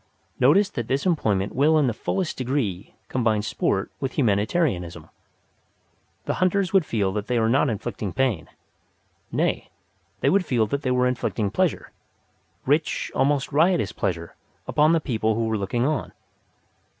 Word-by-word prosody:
Notice 165 +11 +5
that 120 -5 -4
this 135 +1 -1
employment 105 - +1
will 155 +4 +4
in 150 - +3
the 120 - 0
fullest 175 - -2
degree 120 -8 -2
combine 110 -4 0
sport 95 -2 -1
with 135 -3 -3
humanitarianism. 100 - 0 1.2
The - - 0
hunters 185 0 +1
would 190 -5 +3
feel 100 -4 0
that 105 0 -3
they 125 - 0
were 110 -1 +2
not 130 +4 +3
inflicting 105 -2 -4
pain. 125 - -1 0.8
Nay, - - -1 0.5
they - - +3
would 195 0 +3
feel 120 -9 +1
that 140 +7 -2
they 130 - -1
were 125 0 +2
inflicting 120 -4 -1
pleasure, 180 +5 -1 0.7
rich, 150 +3 0
almost 140 +1 +1
riotous 150 - +2
pleasure, 85 -2 -3 0.3
upon 155 +2 +3
the 165 - +3
people 110 -5 0
who 115 +1 0
were 110 0 0
looking 120 +5 -1
on. 150 0 -2
125 Hz, 150 wpm, -24 LUFS, 105-150 Hz, 1.2 s, Notice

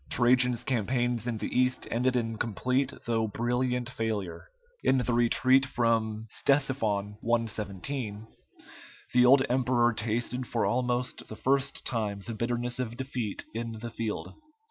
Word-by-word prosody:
Trajan's 125 0 +4
campaigns 120 -1 0
in 120 -2 -1
the - - -4
East 130 0 +1
ended 125 +2 +1
in 115 -2 -1
complete 130 +4 0
though 115 -1 +1
brilliant 125 +3 -1
failure. 110 -8 -4 0.3
In 135 - +4
the 125 -1 0
retreat 130 +3 +4
from 115 -4 0
Ctesiphon 110 -8 0
(117), 110 0 -2 0.9
the 125 0 +6
old 135 +1 +7
emperor 120 -1 +2
tasted 120 +3 -2
for 115 - 0
almost 125 0 -1
the 110 - -8
first 135 +5 0
time 105 -4 -2
the 115 - -4
bitterness 120 +2 -2
of 120 -2 -3
defeat 125 -6 -4
in 115 0 -4
the 115 +1 -7
field. 115 -1 -4
120 Hz, 135 wpm, -29 LUFS, 110-125 Hz, 0.9 s, old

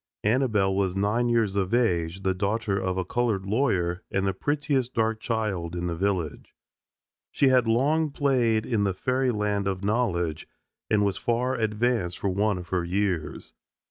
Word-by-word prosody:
Annabelle 105 -4 +2
was 95 -2 0
nine 105 +5 +1
years 115 -4 +1
of 100 +2 +1
age, 90 -6 0
the 95 - +2
daughter 100 +2 -1
of 95 -1 -2
a 95 - -1
colored 110 -2 -1
lawyer, 95 -6 0
and 95 0 0
the 95 - +1
prettiest 140 +2 -1
dark 110 -1 +1
child 105 -8 -2
in 85 0 -3
the 85 -1 -2
village. 90 -5 -2 0.8
She 140 - +3
had 125 -3 +3
long 150 +7 +2
played 125 -6 +1
in 110 -4 0
the 95 -2 0
fairyland 105 -5 0
of 95 0 -2
knowledge, 95 -8 -1 0.4
and 105 -1 +3
was 100 -2 -1
far 120 +2 0
advanced 110 -4 0
for 100 - -1
one 100 +1 +1
of 90 -1 -8
her 90 -2 0
years. 90 -2 -2
105 Hz, 165 wpm, -26 LUFS, 95-120 Hz, 0.8 s, She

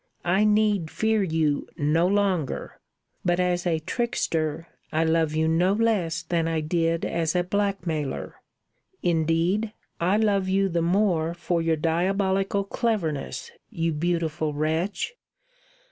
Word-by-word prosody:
I 190 +4 +3
need 210 -5 +2
fear 220 +3 +1
you 160 -5 0
no 160 +4 +2
longer. 190 -7 0 0.4
But 175 0 +1
as 180 0 +1
a 165 -2 +2
trickster 165 -5 -2 0.2
I 160 +1 +2
love 160 -1 +1
you 160 0 +2
no 175 +4 +3
less 205 -7 +1
than 165 -2 0
I 165 -1 0
did 165 +1 0
as 165 0 -1
a 180 - +3
blackmailer. 180 -6 -2 0.6
Indeed, 170 +6 +1 0.3
I 185 +4 +2
love 200 -3 +2
you 195 +1 +2
the 170 -1 0
more 170 -2 +1
for 175 0 -1
your 165 0 +2
diabolical 190 +5 +1
cleverness, 200 - -2 0.2
you 165 -6 -1
beautiful 160 -1 -1
wretch! 165 - -1
175 Hz, 130 wpm, -25 LUFS, 160-195 Hz, 0.6 s, I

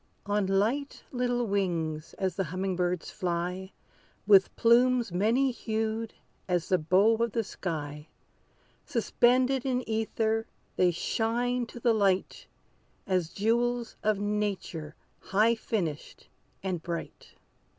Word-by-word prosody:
On 205 -1 0
light 225 +9 0
little 245 -1 0
wings 170 -6 -2
as 185 -3 -2
the 195 - -1
humming 185 +3 -2
birds 180 -1 -1
fly, 180 +2 -3 0.5
With 195 -2 +5
plumes 240 -1 +4
many 230 +9 +2
hued 220 -1 -3 0.3
as 175 -2 0
the 185 - +3
bow 195 +8 +4
of 235 -1 0
the 230 - +1
sky, 150 -6 -5 0.8
Suspended 250 +3 +2
in 255 -2 -1
ether, 220 0 0 0.3
they 180 - +4
shine 235 +7 -1
to 240 - -10
the 235 0 +3
light 195 -3 0 0.6
As 185 -4 0
jewels 235 +4 0
of 215 -1 +2
nature 200 -7 -3 0.2
high 215 +4 +3
finished 185 -9 -4 0.3
and 185 -4 -2
bright. 170 0 -6
210 Hz, 120 wpm, -29 LUFS, 180-235 Hz, 0.8 s, With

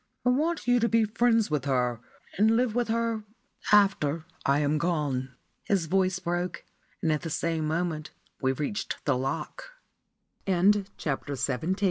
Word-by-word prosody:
I - - +5
want 310 +4 0
you 245 0 +4
to 230 0 +2
be 230 0 +4
friends 225 -2 +2
with 145 -3 0
her, 125 -3 0 0.3
and 220 +3 +4
live 245 -2 +1
with 245 0 0
her 230 -1 -1 0.5
after 170 -7 +3 0.2
I 140 +1 +4
am 150 +1 +1
gone." 145 -6 -1 0.3
His 195 -5 +1
voice 185 +2 +1
broke, 175 0 -3 0.4
and, 160 - +2
at 155 - 0
the 165 - -4
same 160 0 -1
moment 160 -1 -2 0.3
we 130 -1 +2
reached 150 +10 -3
the - - +2
lock. 135 - -4 0.7
*CHAPTER 185 -7 +1
XVIII. 160 +8 -1
175 Hz, 150 wpm, -28 LUFS, 150-220 Hz, 0.7 s, I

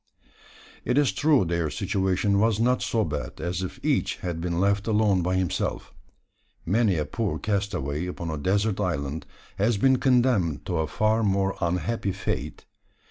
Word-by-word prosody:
It 125 - 0
is 145 -3 +4
true 145 -8 +3
their 85 -2 -1
situation 100 +1 0
was 110 0 +2
not 125 +2 +2
so 110 -2 0
bad 75 -4 -5
as 85 +3 -2
if 95 - -5
each - - +1
had 85 -2 -4
been 85 0 -1
left 100 +2 +1
alone 105 -4 +3
by 90 +2 0
himself. 95 -3 -2 0.7
Many 105 +1 +2
a 75 - -1
poor 110 +6 -2
castaway 90 -6 -2
upon 85 -2 -5
a 80 - -3
desert 100 +5 0
island 75 -5 -2 0.3
has 105 +2 +2
been 130 +5 +4
condemned 120 - +2
to 90 - -2
a 80 -1 0
far 110 +8 +1
more 100 -2 +1
unhappy 90 +4 -1
fate. 95 -1 -4
95 Hz, 160 wpm, -26 LUFS, 85-110 Hz, 0.7 s, is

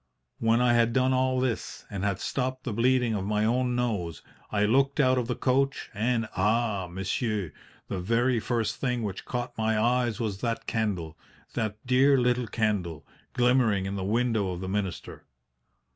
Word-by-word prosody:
When 115 +1 +3
I 125 -1 +4
had 115 -1 +3
done 130 0 +3
all 130 0 +2
this, 125 -3 -3
and 100 -2 -4
had 100 -3 0
stopped 130 0 -2
the 120 - -3
bleeding 125 +1 +2
of 100 -3 -2
my 105 +1 0
own 125 +2 +1
nose, 100 -10 -2 0.3
I 105 -1 +2
looked 135 +6 +2
out 130 -2 +4
of 120 - -2
the 125 - -1
coach 135 +1 0
and 115 +2 0
ah, 105 -1 +1
monsieur, 95 - -2 0.4
the 95 - -3
very 115 +6 +1
first 110 -2 -1
thing 125 -3 -1
which 100 -3 -5
caught 120 0 -4
my 110 0 +1
eyes 120 -1 +1
was 105 -4 -3
that 115 -2 -2
candle 100 -8 -2 0.3
that 110 -3 -2
dear 135 +2 +4
little 125 -1 +1
candle 105 -9 -1 0.3
glimmering 120 -6 +3
in 95 +1 -3
the 95 - -3
window 110 -1 +1
of 90 -1 -4
the 95 - -5
minister. 95 -2 -4
115 Hz, 175 wpm, -27 LUFS, 105-125 Hz, 0.4 s, I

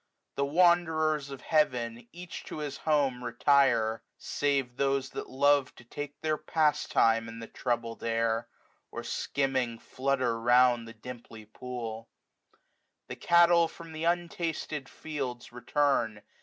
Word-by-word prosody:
The 140 - 0
wanderers 155 -2 +3
of 135 -2 -8
heaven, 125 -7 +1
80 120 0 -19
Each 175 0 -8
to - - -7
his 145 -2 -4
home, 140 -5 +1
retire; 120 -2 +3 0.2
save 140 -4 -1
those 135 -1 0
that - - -6
love 140 0 +2
To - - -14
take 145 +4 -7
their 155 -1 0
pastime 115 -7 +2
in 115 - -9
the 115 - -7
troubled 115 -1 -3
air; 115 0 0 0.4
Or - - -6
skimming 130 -4 -1
flutter 130 -3 -1
round 120 0 +4
the 115 - -11
dimply 115 -1 -10
pool. 115 0 -7 1.0
The - - -5
cattle 170 0 +5
from 165 0 -12
the 160 +1 -4
untasted 170 -4 -2
fields 135 -6 -5
return. 120 -3 0
135 Hz, 130 wpm, -29 LUFS, 115-150 Hz, 1.0 s, cattle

